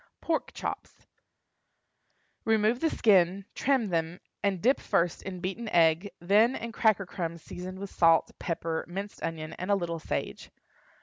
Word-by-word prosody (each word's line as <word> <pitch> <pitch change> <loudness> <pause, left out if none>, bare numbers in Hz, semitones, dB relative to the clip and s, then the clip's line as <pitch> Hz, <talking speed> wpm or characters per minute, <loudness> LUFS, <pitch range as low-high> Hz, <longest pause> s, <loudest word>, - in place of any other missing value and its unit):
PORK 325 -1 -1
CHOPS. - - -6 1.4
Remove 220 +2 +2
the 325 - +2
skin, 190 - +3
trim 260 -6 +1
them, 165 +1 -1 0.2
and 200 -2 0
dip 255 +9 +3
first 170 0 0
in 185 -2 -7
beaten 195 +5 -4
egg, 165 +2 +3
then 210 +8 +4
in 235 - -5
cracker 215 -3 +2
crumbs 170 -3 -5
seasoned 185 +1 -7
with 195 0 -7
salt, 165 -1 +4
pepper, 165 -2 -2
minced 195 +4 -6
onion, 160 -1 -4
and 185 - -4
a 200 - +5
little 170 -3 -3
sage. - - -4
190 Hz, 145 wpm, -29 LUFS, 170-215 Hz, 1.4 s, a